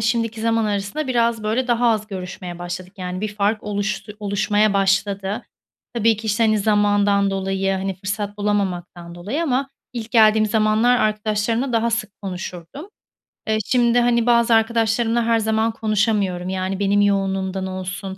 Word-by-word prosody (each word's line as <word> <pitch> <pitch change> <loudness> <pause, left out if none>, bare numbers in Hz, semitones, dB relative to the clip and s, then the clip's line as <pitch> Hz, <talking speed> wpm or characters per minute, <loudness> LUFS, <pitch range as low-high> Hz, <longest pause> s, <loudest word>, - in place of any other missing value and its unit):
şimdiki 225 0 -1
zaman 225 0 +1
arasında 205 +8 -2
biraz, 235 -3 +1
böyle, 225 +4 0
daha 240 0 +3
az 215 -1 -1
görüşmeye 180 -3 -7
başladık. 180 +1 -6
Yani, 180 0 -4
bir 210 0 -4
fark 210 +1 0
oluştu 210 +1 -3
oluşmaya 205 +1 +1
başladı. 195 +1 0 0.5
Tabii 225 -1 +3
ki, 220 +2 -8
işte, 220 +2 +2
hani, 215 -1 +3
zamandan 205 -1 +2
dolayı, 195 0 -1
hani, 190 0 -2
fırsat 200 +2 -4
bulamamaktan 180 -4 -2
dolayı 210 - -3
ama 270 -2 -1 0.2
ilk 230 -2 -6
geldiğim 220 -1 +5
zamanlar 220 +3 +3
arkadaşlarımla 215 +4 0
daha 230 0 +1
sık 230 -2 -2
konuşurdum. 185 - -7 0.6
Eee, 220 0 +1
şimdi 245 -1 +3
hani 235 -1 +2
bazı 235 -1 +4
arkadaşlarımla 225 +1 +1
her 230 0 +2
zaman 220 +1 +1
konuşamıyorum. 205 -4 0
Yani, 190 0 -2
benim 205 0 +2
yoğunluğumdan 195 -1 0
olsun, 190 +1 -5
210 Hz, 150 wpm, -21 LUFS, 195-225 Hz, 0.6 s, geldiğim